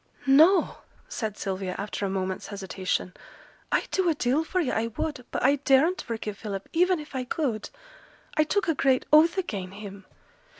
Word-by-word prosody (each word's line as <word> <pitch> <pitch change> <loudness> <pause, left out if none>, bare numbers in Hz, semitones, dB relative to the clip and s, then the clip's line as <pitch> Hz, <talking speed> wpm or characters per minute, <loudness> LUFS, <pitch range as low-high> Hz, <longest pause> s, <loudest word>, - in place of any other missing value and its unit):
'No!' 315 +8 +5 0.3
said 220 - -4
Sylvia, 190 -2 -3
after 205 0 -4
a 195 - 0
moment's 190 -1 -3
hesitation; 190 -2 -3 0.6
'I'd - - 0
do 375 -2 +2
a 320 - +1
deal 275 +3 +1
for 370 +3 -2
yo', 310 -8 0
I 225 +1 0
would, 250 +2 -4
but - - -3
I 280 +3 +4
daren't 285 +6 +3
forgive 215 -3 -5
Philip, 200 -3 -5
even 360 +1 +3
if 300 -1 -10
I 260 - -1
could; 250 -5 -2 0.7
I 310 - +4
took 385 +6 0
a 325 - +3
great 265 -3 +2
oath 325 +4 +6
again' 195 - -3
him. 200 -1 -10
250 Hz, 175 wpm, -26 LUFS, 200-315 Hz, 0.7 s, oath